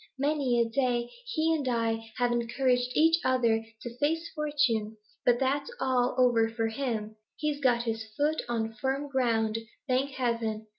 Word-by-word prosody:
Many 280 Hz, -3 st, +1 dB
a 235 Hz, -, +3 dB
day 240 Hz, 0 st, 0 dB, 0.2 s
he 325 Hz, -9 st, +1 dB
and 290 Hz, -4 st, -1 dB
I 225 Hz, -2 st, -1 dB
have 245 Hz, -1 st, +2 dB
encouraged 245 Hz, +1 st, +1 dB
each 325 Hz, +1 st, +5 dB
other 235 Hz, -3 st, +2 dB, 0.2 s
to 240 Hz, 0 st, -7 dB
face 325 Hz, +3 st, 0 dB
fortune, 280 Hz, -8 st, 0 dB, 0.3 s
but 240 Hz, -1 st, +5 dB
that's 275 Hz, +2 st, 0 dB
all 255 Hz, -1 st, +1 dB
over 240 Hz, -3 st, +4 dB
for 225 Hz, 0 st, -1 dB
him; 220 Hz, -3 st, -3 dB, 0.2 s
he's 300 Hz, -2 st, -2 dB
got 245 Hz, -4 st, +2 dB
his 225 Hz, -1 st, -2 dB
foot 300 Hz, +2 st, +1 dB
on 225 Hz, -1 st, -1 dB
firm 270 Hz, +6 st, -2 dB
ground, 225 Hz, -4 st, +1 dB, 0.3 s
thank 260 Hz, +1 st, +1 dB
heaven! 230 Hz, -3 st, -1 dB
245 Hz, 155 wpm, -29 LUFS, 230-280 Hz, 0.3 s, each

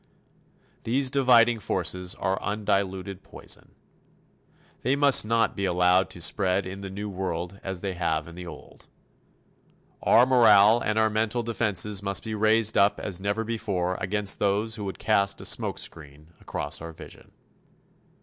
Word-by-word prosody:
These 130 Hz, +3 st, +1 dB
dividing 120 Hz, -4 st, +4 dB
forces 90 Hz, -1 st, -2 dB
are 95 Hz, 0 st, -2 dB
undiluted 100 Hz, -2 st, -2 dB
poison. -, -, -8 dB, 1.1 s
They 130 Hz, +3 st, +1 dB
must 140 Hz, -5 st, +5 dB
not 115 Hz, 0 st, +1 dB
be 100 Hz, -, -2 dB
allowed 90 Hz, +1 st, +2 dB
to 95 Hz, -, -10 dB
spread 90 Hz, +4 st, +1 dB
in 95 Hz, +2 st, -7 dB
the 100 Hz, -, -6 dB
New 100 Hz, +2 st, -6 dB
World 90 Hz, -1 st, -5 dB
as 95 Hz, -2 st, -4 dB
they 95 Hz, -2 st, -3 dB
have 80 Hz, -3 st, -2 dB
in 85 Hz, -, -11 dB
the 90 Hz, +1 st, -9 dB
Old. -, -, -13 dB, 1.1 s
Our 120 Hz, -, +5 dB
morale 115 Hz, -3 st, +6 dB
and 105 Hz, -2 st, -2 dB
our 110 Hz, 0 st, +3 dB
mental 110 Hz, +2 st, -1 dB
defenses 105 Hz, -3 st, -1 dB
must 100 Hz, -1 st, -1 dB
be 110 Hz, -, -5 dB
raised 110 Hz, +1 st, +2 dB
up 100 Hz, +1 st, +3 dB
as 95 Hz, -2 st, -4 dB
never 100 Hz, +3 st, -1 dB
before 100 Hz, -6 st, -2 dB
against 100 Hz, +1 st, -1 dB
those 105 Hz, +2 st, 0 dB
who 105 Hz, -2 st, -4 dB
would 95 Hz, -, -5 dB
cast 100 Hz, -2 st, +1 dB
a -, -, -9 dB
smokescreen 75 Hz, 0 st, -3 dB
across -, -, -3 dB
our 85 Hz, 0 st, -8 dB
vision. -, -, -13 dB
100 Hz, 150 wpm, -26 LUFS, 95-110 Hz, 1.1 s, morale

